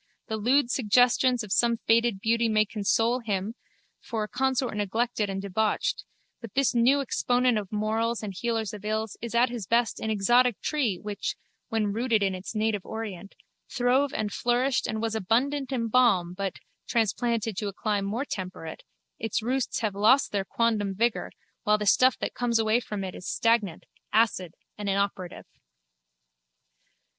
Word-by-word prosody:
The 220 Hz, -, -1 dB
lewd 245 Hz, +4 st, +2 dB
suggestions 245 Hz, +1 st, +3 dB
of 210 Hz, -, -9 dB
some 235 Hz, +2 st, +3 dB
faded 230 Hz, -3 st, +2 dB
beauty 230 Hz, +1 st, +2 dB
may 215 Hz, 0 st, +3 dB
console 225 Hz, +4 st, +1 dB
him 205 Hz, -2 st, -2 dB, 0.5 s
for 220 Hz, -2 st, -3 dB
a -, -, -4 dB
consort 260 Hz, 0 st, 0 dB
neglected 210 Hz, +1 st, -1 dB
and 195 Hz, 0 st, -3 dB
debauched 200 Hz, +2 st, -1 dB, 0.4 s
but 230 Hz, -2 st, -10 dB
this 275 Hz, -1 st, +2 dB
new 250 Hz, +4 st, +4 dB
exponent 245 Hz, -2 st, +1 dB
of 200 Hz, -3 st, -8 dB
morals 220 Hz, +2 st, -1 dB
and 205 Hz, -2 st, -4 dB
healer 230 Hz, +2 st, -1 dB
of 210 Hz, -1 st, -8 dB
ills 215 Hz, 0 st, -2 dB
is 235 Hz, 0 st, -5 dB
at 240 Hz, +2 st, +4 dB
his 230 Hz, -6 st, -5 dB
best 235 Hz, +1 st, +1 dB
an 220 Hz, -, -3 dB
exotic 240 Hz, +3 st, +3 dB
tree 260 Hz, -11 st, 0 dB
which, 210 Hz, -1 st, -4 dB, 0.3 s
when 215 Hz, -4 st, 0 dB
rooted 225 Hz, -2 st, +1 dB
in 195 Hz, -1 st, +1 dB
its 185 Hz, +4 st, -7 dB
native 215 Hz, -2 st, 0 dB
orient, 205 Hz, -4 st, -7 dB, 0.3 s
throve 260 Hz, +2 st, +2 dB
and 210 Hz, -1 st, -3 dB
flourished 250 Hz, +2 st, +1 dB
and 220 Hz, 0 st, -3 dB
was 225 Hz, -1 st, -1 dB
abundant 260 Hz, +7 st, 0 dB
in 235 Hz, -3 st, -1 dB
balm 210 Hz, -8 st, +3 dB
but, 195 Hz, 0 st, -3 dB, 0.3 s
transplanted 230 Hz, -1 st, 0 dB
to 210 Hz, -, -2 dB
a -, -, -3 dB
clime 205 Hz, 0 st, -1 dB
more 220 Hz, +8 st, -2 dB
temperate, 185 Hz, -, -6 dB, 0.4 s
its 225 Hz, 0 st, -2 dB
roots 255 Hz, +1 st, -1 dB
have 215 Hz, -3 st, -1 dB
lost 220 Hz, +8 st, +4 dB
their 200 Hz, -2 st, 0 dB
quondam 210 Hz, -2 st, 0 dB
vigour 235 Hz, +3 st, 0 dB, 0.3 s
while 210 Hz, 0 st, +3 dB
the 210 Hz, -, -3 dB
stuff 255 Hz, +5 st, +4 dB
that -, -, -3 dB
comes 240 Hz, -2 st, 0 dB
away 220 Hz, +1 st, +2 dB
from 210 Hz, -4 st, -5 dB
it 185 Hz, -1 st, -5 dB
is 180 Hz, -, -7 dB
stagnant, 225 Hz, -7 st, +1 dB, 0.3 s
acid 200 Hz, -6 st, +1 dB, 0.2 s
and 205 Hz, -1 st, -2 dB
inoperative. 195 Hz, -2 st, -2 dB
225 Hz, 165 wpm, -27 LUFS, 205-240 Hz, 0.5 s, new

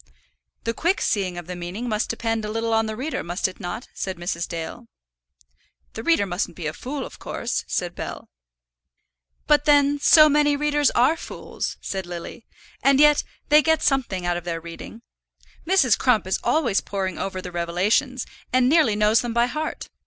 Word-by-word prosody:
"The 230 Hz, -, -1 dB
quick 345 Hz, -, 0 dB
seeing 185 Hz, -4 st, -1 dB
of 175 Hz, -, -6 dB
the 180 Hz, +1 st, -6 dB
meaning 175 Hz, +7 st, -5 dB
must 215 Hz, -1 st, -1 dB
depend 225 Hz, -1 st, -2 dB
a 210 Hz, -, -4 dB
little 225 Hz, +1 st, -1 dB
on 225 Hz, 0 st, +2 dB
the 220 Hz, -, -4 dB
reader, 260 Hz, +3 st, -3 dB
must 175 Hz, +3 st, -1 dB
it 185 Hz, -, -11 dB
not?" 180 Hz, +8 st, -5 dB
said 190 Hz, -2 st, -4 dB
Mrs. 175 Hz, 0 st, -3 dB
Dale. 170 Hz, +8 st, -6 dB, 1.1 s
"The 225 Hz, -, -5 dB
reader 325 Hz, -5 st, +2 dB
mustn't 180 Hz, -2 st, -3 dB
be 170 Hz, -, -6 dB
a 150 Hz, -, -2 dB
fool, 265 Hz, -, -5 dB
of -, -, -12 dB
course," 240 Hz, -, -3 dB
said 175 Hz, -1 st, -2 dB
Bell. -, -, -7 dB, 1.2 s
"But 295 Hz, -1 st, +3 dB
then 290 Hz, -1 st, +4 dB
so 305 Hz, +2 st, +7 dB
many 295 Hz, 0 st, +3 dB
readers 295 Hz, -1 st, +2 dB
are 250 Hz, +7 st, +4 dB
fools," -, -, -6 dB
said 190 Hz, -2 st, -4 dB
Lily. 175 Hz, +6 st, -8 dB, 0.3 s
"And 275 Hz, +1 st, +4 dB
yet 295 Hz, 0 st, +6 dB, 0.3 s
they 300 Hz, +1 st, +7 dB
get 320 Hz, +1 st, +2 dB
something 235 Hz, -10 st, 0 dB
out 175 Hz, 0 st, 0 dB
of 175 Hz, -, -6 dB
their 165 Hz, -1 st, -3 dB
reading. 170 Hz, +7 st, -10 dB, 0.6 s
Mrs. 335 Hz, -, +4 dB
Crump 245 Hz, -7 st, +3 dB
is 190 Hz, -, -1 dB
always 245 Hz, -11 st, +2 dB
poring 190 Hz, -3 st, -3 dB
over 190 Hz, -1 st, -3 dB
the 180 Hz, -1 st, -7 dB
Revelations, 195 Hz, +10 st, 0 dB, 0.3 s
and 255 Hz, 0 st, +3 dB
nearly 280 Hz, -7 st, +4 dB
knows 210 Hz, +2 st, +3 dB
them 235 Hz, -1 st, -4 dB
by 235 Hz, 0 st, +4 dB
heart. 305 Hz, +5 st, -4 dB
225 Hz, 180 wpm, -23 LUFS, 180-280 Hz, 1.2 s, so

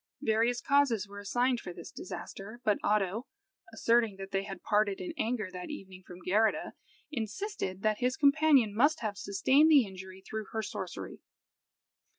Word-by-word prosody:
Various 230 Hz, +2 st, +2 dB
causes 265 Hz, -8 st, +2 dB
were 200 Hz, 0 st, -9 dB
assigned 245 Hz, +4 st, +1 dB
for 180 Hz, -, -7 dB
this 170 Hz, -, -10 dB
disaster; 200 Hz, +4 st, -8 dB
but 210 Hz, -3 st, +2 dB
Oddo, 210 Hz, +3 st, +1 dB, 0.4 s
asserting 230 Hz, -3 st, +2 dB
that 195 Hz, 0 st, -8 dB
they 195 Hz, -, +1 dB
had 195 Hz, -3 st, -8 dB
parted 205 Hz, -1 st, +1 dB
in 185 Hz, -, -5 dB
anger 220 Hz, -5 st, -2 dB
that 180 Hz, -1 st, -6 dB
evening 190 Hz, -10 st, -8 dB
from 180 Hz, -1 st, -11 dB
Geirrida, 215 Hz, +4 st, +2 dB, 0.4 s
insisted 220 Hz, -, -4 dB
that 215 Hz, -1 st, +1 dB
his 250 Hz, +1 st, 0 dB
companion 280 Hz, -6 st, +4 dB
must 290 Hz, +9 st, +3 dB
have 215 Hz, -3 st, -2 dB
sustained 260 Hz, +11 st, +3 dB
the 285 Hz, -6 st, +7 dB
injury 190 Hz, -1 st, -10 dB
through 220 Hz, -1 st, -4 dB
her 220 Hz, 0 st, -1 dB
sorcery. -, -, -6 dB
215 Hz, 160 wpm, -31 LUFS, 195-245 Hz, 0.4 s, the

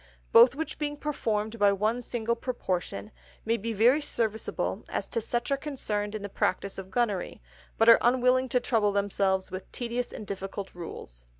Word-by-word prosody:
Both 465 Hz, -, +8 dB
which 320 Hz, +2 st, -4 dB
being 295 Hz, -1 st, -2 dB
performed 225 Hz, -7 st, -2 dB
by 205 Hz, -1 st, +5 dB
one 215 Hz, +5 st, 0 dB
single 235 Hz, -1 st, -1 dB
Proportion, 185 Hz, -, -3 dB, 0.3 s
may 225 Hz, +1 st, +2 dB
be 230 Hz, +1 st, -3 dB
very 240 Hz, +8 st, +4 dB
serviceable 220 Hz, -6 st, -2 dB
to 230 Hz, -, -2 dB
such 240 Hz, +4 st, -2 dB
as -, -, +5 dB
are -, -, +1 dB
concerned 215 Hz, -8 st, -3 dB
in 210 Hz, -, -5 dB
the -, -, -3 dB
Practice 195 Hz, 0 st, -1 dB
of 190 Hz, -1 st, -8 dB
Gunnery, 210 Hz, -4 st, -1 dB, 0.4 s
but 225 Hz, -, +3 dB
are 230 Hz, -, +9 dB
unwilling 255 Hz, +1 st, +3 dB
to 250 Hz, -, +2 dB
trouble 220 Hz, -4 st, +1 dB
themselves 195 Hz, -2 st, 0 dB
with 185 Hz, 0 st, -7 dB
tedious 245 Hz, 0 st, -3 dB
and 215 Hz, -, -7 dB
difficult 195 Hz, 0 st, -5 dB
Rules. -, -, -9 dB
220 Hz, 175 wpm, -28 LUFS, 200-245 Hz, 0.4 s, are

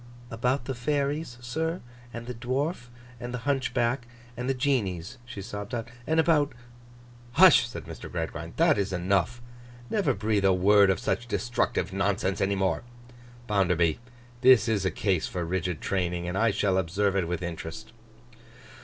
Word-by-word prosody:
'About 125 Hz, +3 st, 0 dB
the 135 Hz, -, -2 dB
Fairies, 140 Hz, +1 st, -1 dB
sir, 160 Hz, +8 st, -2 dB, 0.3 s
and 115 Hz, 0 st, -7 dB
the 125 Hz, -, -5 dB
Dwarf, 130 Hz, +4 st, -2 dB, 0.3 s
and 120 Hz, 0 st, -5 dB
the 120 Hz, -1 st, -7 dB
Hunchback, 125 Hz, -3 st, 0 dB, 0.3 s
and 125 Hz, +2 st, -3 dB
the 135 Hz, -, +1 dB
Genies,' 120 Hz, -, -1 dB
she 115 Hz, -5 st, -7 dB
sobbed 105 Hz, +2 st, -5 dB
out; 115 Hz, 0 st, -4 dB, 0.2 s
'and 160 Hz, +1 st, +2 dB
about—' 155 Hz, -4 st, +3 dB, 0.8 s
'Hush!' 165 Hz, -5 st, +7 dB
said 85 Hz, -9 st, -7 dB
Mr. 80 Hz, +1 st, -9 dB
Gradgrind, 85 Hz, -1 st, -4 dB
'that 160 Hz, -8 st, +4 dB
is 100 Hz, -1 st, -1 dB
enough. 95 Hz, +6 st, 0 dB, 0.5 s
Never 210 Hz, -3 st, +1 dB
breathe 105 Hz, 0 st, 0 dB
a 95 Hz, -, +5 dB
word 100 Hz, +2 st, +5 dB
of 95 Hz, -, +2 dB
such 120 Hz, -, -1 dB
destructive 120 Hz, -7 st, -1 dB
nonsense 100 Hz, -1 st, 0 dB
any 100 Hz, +1 st, +2 dB
more. 95 Hz, -1 st, 0 dB, 0.6 s
Bounderby, 90 Hz, -7 st, +2 dB, 0.4 s
this 130 Hz, -2 st, +6 dB
is 105 Hz, -4 st, +1 dB
a -, -, +3 dB
case 90 Hz, -1 st, 0 dB
for 90 Hz, -2 st, -3 dB
rigid 90 Hz, -2 st, -2 dB
training, 90 Hz, -2 st, -1 dB
and 90 Hz, -, -3 dB
I 115 Hz, +3 st, +3 dB
shall 100 Hz, -2 st, +1 dB
observe 95 Hz, +3 st, 0 dB
it 95 Hz, -4 st, +1 dB
with 90 Hz, +1 st, -3 dB
interest. 90 Hz, +6 st, -6 dB
105 Hz, 160 wpm, -27 LUFS, 95-125 Hz, 0.8 s, Hush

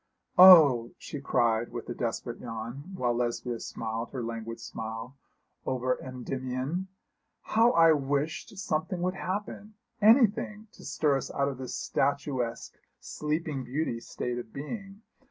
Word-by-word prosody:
'Oh,' 150 Hz, -11 st, +8 dB
she 145 Hz, -, -7 dB
cried 115 Hz, -3 st, +1 dB
with 120 Hz, -, -6 dB
a 120 Hz, -, -3 dB
desperate 120 Hz, 0 st, -3 dB
yawn, 120 Hz, +8 st, -7 dB
while 120 Hz, -7 st, 0 dB
Lesbia 120 Hz, 0 st, -2 dB
smiled 115 Hz, +1 st, -4 dB
her 130 Hz, -3 st, -5 dB
languid 115 Hz, 0 st, -5 dB
smile 115 Hz, +3 st, -6 dB, 0.5 s
over 130 Hz, 0 st, -1 dB
Endymion, 130 Hz, +6 st, -4 dB, 0.6 s
'how 230 Hz, +2 st, +4 dB
I 165 Hz, -1 st, +7 dB
wished 145 Hz, +6 st, -1 dB
something 175 Hz, 0 st, -2 dB
would 185 Hz, 0 st, +1 dB
happen 205 Hz, +2 st, -5 dB, 0.3 s
anything 215 Hz, -1 st, +4 dB
to -, -, -16 dB
stir 145 Hz, -3 st, +1 dB
us -, -, -5 dB
out 140 Hz, 0 st, 0 dB
of 135 Hz, -2 st, -7 dB
this 130 Hz, -, -5 dB
statuesque, 135 Hz, -4 st, -1 dB, 0.3 s
sleeping 150 Hz, -2 st, -3 dB
beauty 125 Hz, -1 st, -2 dB
state 120 Hz, +1 st, -4 dB
of 120 Hz, -, -9 dB
being. 195 Hz, +7 st, -7 dB
135 Hz, 135 wpm, -29 LUFS, 120-170 Hz, 0.6 s, Oh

